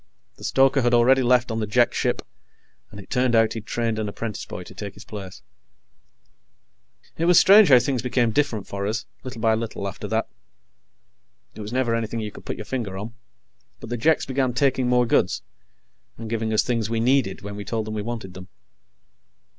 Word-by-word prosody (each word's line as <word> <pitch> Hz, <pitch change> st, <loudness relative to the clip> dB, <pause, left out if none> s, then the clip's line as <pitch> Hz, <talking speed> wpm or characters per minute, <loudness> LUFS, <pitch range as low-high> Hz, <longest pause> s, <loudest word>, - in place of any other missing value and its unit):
The -, -, -14 dB
stoker 135 Hz, +1 st, +3 dB
had 120 Hz, 0 st, +3 dB
already 130 Hz, +3 st, +5 dB
left 125 Hz, -1 st, +2 dB
on 110 Hz, -, -2 dB
the 110 Hz, -, -2 dB
Jek 120 Hz, +3 st, +3 dB
ship, -, -, -1 dB, 0.7 s
and 100 Hz, -, -11 dB
it 95 Hz, -, -13 dB
turned 125 Hz, -1 st, +2 dB
out 115 Hz, -1 st, +3 dB
he'd 110 Hz, -2 st, -7 dB
trained 115 Hz, -2 st, -1 dB
an 105 Hz, -1 st, -2 dB
apprentice 105 Hz, 0 st, -5 dB
boy -, -, -7 dB
to -, -, -13 dB
take -, -, -7 dB
his -, -, -13 dB
place. 100 Hz, -3 st, -9 dB, 1.8 s
It 165 Hz, -, +1 dB
was 175 Hz, 0 st, +5 dB
strange 205 Hz, -1 st, +7 dB
how 130 Hz, -, +9 dB
things 125 Hz, 0 st, 0 dB
became 120 Hz, -1 st, +1 dB
different 115 Hz, -7 st, 0 dB
for 100 Hz, 0 st, -4 dB
us, 110 Hz, +2 st, -2 dB, 0.2 s
little 125 Hz, -2 st, -7 dB
by 110 Hz, -1 st, +3 dB
little 110 Hz, -3 st, -3 dB
after 95 Hz, -, -6 dB
that. -, -, -1 dB, 1.3 s
It -, -, -9 dB
was 105 Hz, +1 st, -6 dB
never 125 Hz, -2 st, 0 dB
anything 115 Hz, 0 st, -2 dB
you 105 Hz, -1 st, -4 dB
could -, -, -13 dB
put -, -, -4 dB
your 110 Hz, -, -8 dB
finger 110 Hz, -6 st, -4 dB
on, 110 Hz, +4 st, -6 dB, 0.7 s
but 115 Hz, -, -10 dB
the -, -, 0 dB
Jeks 155 Hz, +7 st, +2 dB
began 130 Hz, -2 st, 0 dB
taking 130 Hz, -2 st, +1 dB
more 125 Hz, 0 st, +3 dB
goods, 60 Hz, -, +1 dB, 0.7 s
and 115 Hz, -1 st, -7 dB
giving 110 Hz, -1 st, -1 dB
us 110 Hz, -, +3 dB
things 115 Hz, -3 st, -1 dB
we 115 Hz, 0 st, -1 dB
needed 125 Hz, -5 st, +1 dB
when 100 Hz, 0 st, -6 dB
we 100 Hz, -, -6 dB
told 110 Hz, +2 st, -3 dB
them 110 Hz, -, -5 dB
we 105 Hz, -, -3 dB
wanted 110 Hz, -4 st, -6 dB
them. 90 Hz, 0 st, -10 dB
115 Hz, 200 wpm, -23 LUFS, 105-125 Hz, 1.8 s, how